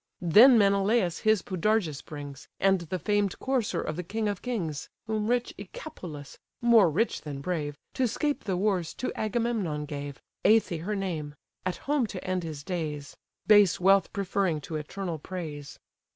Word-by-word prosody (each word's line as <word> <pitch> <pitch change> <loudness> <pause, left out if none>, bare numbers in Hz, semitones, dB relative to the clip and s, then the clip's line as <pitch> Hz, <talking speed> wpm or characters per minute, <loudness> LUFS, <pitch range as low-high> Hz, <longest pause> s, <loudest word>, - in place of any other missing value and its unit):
Then 220 - +7
Menelaus 200 -2 +3
his 215 -3 +2
Podargus 185 -5 0
brings, 145 -2 -9
And 195 -2 +3
the 170 +2 -3
famed 205 0 0
courser 260 -5 -1
of 155 - -3
the - - -1
king 215 +5 -2
of 205 -2 -2
kings: 175 - -3 0.2
Whom 215 -1 -1
rich 245 +1 0
Echepolus 180 - -9 0.2
(more 235 -6 +6
rich 210 +10 0
than 145 -2 -6
brave), 145 -2 -3 0.2
To 255 - +1
'scape 290 +2 -2
the 190 -3 0
wars, 185 -4 0
to 255 - -3
Agamemnon 215 -9 -1
gave, 145 -2 -6 0.2
(Æthe 210 -7 +3
her 210 +1 -1
name) 160 -7 -3 0.3
at 185 - -2
home 285 -4 +1
to 190 -3 -7
end 185 0 0
his 155 -4 -6
days; 150 -5 -4 0.3
Base 205 -4 +6
wealth 195 +1 +4
preferring 195 -4 0
to 160 +3 -6
eternal 165 +2 -4
praise. 150 -4 -7
185 Hz, 160 wpm, -28 LUFS, 155-215 Hz, 0.3 s, Then